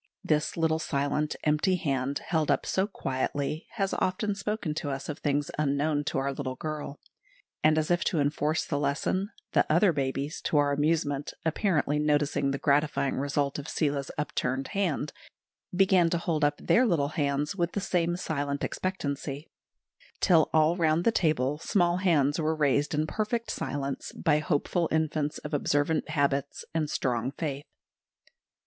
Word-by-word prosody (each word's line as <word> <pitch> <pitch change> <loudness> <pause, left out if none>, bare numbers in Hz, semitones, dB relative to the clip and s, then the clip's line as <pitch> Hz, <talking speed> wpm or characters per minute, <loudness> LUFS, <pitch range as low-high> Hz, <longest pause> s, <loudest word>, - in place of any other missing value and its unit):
This 150 +1 0
little 160 -1 +2
silent, 150 0 -1
empty 155 +5 +2
hand, 140 -5 -1
held 160 -3 0
up 140 - +2
so 190 +1 +1
quietly, 140 -1 -3
has 195 -3 -1
often 205 +3 0
spoken 200 -4 -3
to 150 -1 -3
us 135 0 -4
of 150 - -4
things 145 -1 0
unknown 145 +1 +1
to - - -2
our 135 +1 0
little 130 -2 -4
girl; 150 -1 -5 0.6
and 155 0 +5
as 155 +2 +1
if 175 0 +2
to 165 - +1
enforce 150 +2 0
the 145 - -1
lesson, 150 +7 0 0.2
the - - +4
other 175 +3 +4
babies, 140 +1 -2
to 150 - +2
our 145 -1 +3
amusement, 145 -1 0
apparently 155 -4 +1
noticing 145 -2 +1
the 135 - -1
gratifying 145 -1 +1
result 140 +1 -1
of 145 - -7
Seela's 140 -2 -1
upturned 135 -2 -2
hand, 170 -8 -1 0.6
began 185 -2 +4
to 170 - +1
hold 165 -2 -1
up 145 0 +2
their 245 - +3
little 145 -8 +1
hands 145 0 -1
with 170 -2 -1
the - - 0
same 175 -3 0
silent 145 -4 -2
expectancy, 145 -5 -3 0.7
till 165 -5 +4
all 155 +2 +4
round 165 -1 +2
the 230 - +4
table 150 - +1
small 175 -1 +2
hands 155 -6 +2
were 160 0 +1
raised 145 0 +1
in 155 +1 +1
perfect 220 +6 -2
silence, 140 0 -3
by 150 -3 +2
hopeful 155 +2 0
infants 155 -1 0
of - - -8
observant 145 +2 +1
habits 140 -1 0
and 155 -2 0
strong 125 -4 -1
faith. 145 -2 -4
150 Hz, 160 wpm, -28 LUFS, 140-165 Hz, 0.7 s, and